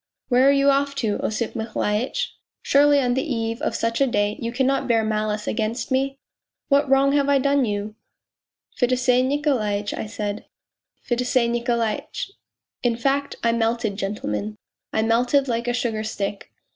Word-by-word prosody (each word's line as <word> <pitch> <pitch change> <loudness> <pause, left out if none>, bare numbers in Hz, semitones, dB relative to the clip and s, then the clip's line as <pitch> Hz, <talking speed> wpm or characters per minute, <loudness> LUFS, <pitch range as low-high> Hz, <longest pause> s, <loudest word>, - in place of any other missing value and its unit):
' - - -55
Where 255 +2 +5
are - - +7
you 280 0 +4
off 280 0 0
to, 220 -6 -1
Osip 220 +1 -2
Mihailitch? 230 - -2 0.3
Surely 285 0 +5
on 250 -2 +1
the 265 - +1
eve 230 -5 -2
of - - -1
such 230 +2 -1
a 275 - +5
day 205 -3 0
you 230 0 -2
cannot 265 +2 +1
bear 230 -2 +3
malice 215 -1 -1
against 225 +3 -2
me? 270 +1 0 0.5
What 280 -1 +3
wrong 270 +1 +4
have 285 0 +2
I 280 - +5
done 280 0 +2
you?.. 205 0 -3 0.3
.' - - -69
' - - -41
Fedosey 250 0 +3
Niko 285 0 +1
laitch,' 205 -1 -2
I - - -4
said, 210 -1 -4 0.3
' - - -52
Fedosey 245 0 +1
Nikolaitch.. 235 - -2 0.3
.' - - -68
In 240 -2 +1
fact, 275 +3 0
I 230 - +3
melted, 230 -2 0
gentlemen, 200 - -3 0.3
I 220 - +1
melted 245 +5 +2
like 235 0 -1
a - - +2
sugar 225 -3 -1
stick. 200 -2 -4
240 Hz, 180 wpm, -23 LUFS, 220-275 Hz, 0.5 s, are